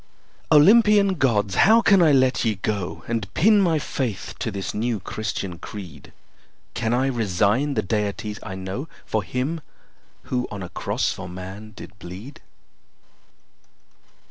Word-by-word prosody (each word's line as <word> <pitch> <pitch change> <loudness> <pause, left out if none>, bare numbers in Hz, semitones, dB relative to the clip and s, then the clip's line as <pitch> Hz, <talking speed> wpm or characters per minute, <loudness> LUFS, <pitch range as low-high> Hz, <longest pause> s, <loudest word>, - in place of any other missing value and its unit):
Olympian 205 +5 +6
Gods! 110 - +1
how 220 - +6
can 195 -2 +5
I 160 -3 +5
let 130 -2 +3
ye 110 -3 +1
go 100 -1 -3
And 115 -4 -3
pin 210 +3 +5
my 170 -4 +2
faith 130 -7 -3
to - - -2
this 100 -2 -4
new 115 0 -1
Christian 95 -3 -4
creed? 85 -9 -9 0.6
Can 110 - -1
I 125 +2 +2
resign 115 +3 +1
the 110 - 0
deities 105 +1 -2
I 95 - -7
know 95 +10 -5 0.2
For 110 - -1
him 130 - -3 0.6
who 125 -1 -2
on 100 -2 -6
a 90 - -7
cross - - -1
for 90 - -8
man 95 +4 -9
did 100 0 -12
bleed? 95 +11 -10
110 Hz, 145 wpm, -23 LUFS, 100-140 Hz, 0.6 s, Olympian